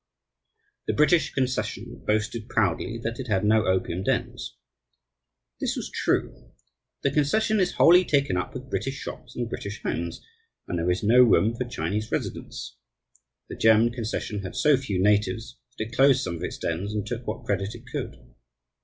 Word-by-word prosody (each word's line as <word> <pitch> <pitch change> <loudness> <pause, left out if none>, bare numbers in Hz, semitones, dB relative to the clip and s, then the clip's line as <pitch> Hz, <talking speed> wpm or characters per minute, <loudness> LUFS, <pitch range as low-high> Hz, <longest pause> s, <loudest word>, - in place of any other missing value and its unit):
The - - +1
British 150 +1 +4
concession 130 -1 -2
boasted 110 +2 -1
proudly 110 +2 0
that 115 +2 -3
it 130 - -5
had 105 -2 +1
no 110 -2 +3
opium 95 -1 0
dens. - - -2 1.0
This - - -1
was - - -5
true. - - -1 0.5
The - - +2
concession 210 +9 +2
is 185 -2 +1
wholly 180 +2 +7
taken 140 - +1
up 90 - -3
with 130 +1 -7
British 135 0 -2
shops - - -8
and 120 -1 -2
British 105 -2 -6
homes, 85 0 -3 0.4
and 90 - -2
there 85 +2 0
is 90 +3 0
no 120 +4 +6
room 115 -2 +4
for 125 +2 -2
Chinese 110 -3 -3
residents. - - -4 0.7
The - - -7
German 110 +1 +5
concession 110 -3 -3
had 95 - -7
so 150 -1 +5
few 115 -8 -2
natives 105 +2 +1 0.2
that 110 - -2
it 115 - -10
closed 135 0 +5
some 85 - -3
of 85 - -7
its - - -4
dens 95 +6 -3
and 105 - -2
took - - -5
what - - -4
credit 100 +4 -1
it 120 - -12
could. - - -4
110 Hz, 170 wpm, -26 LUFS, 100-130 Hz, 1.0 s, wholly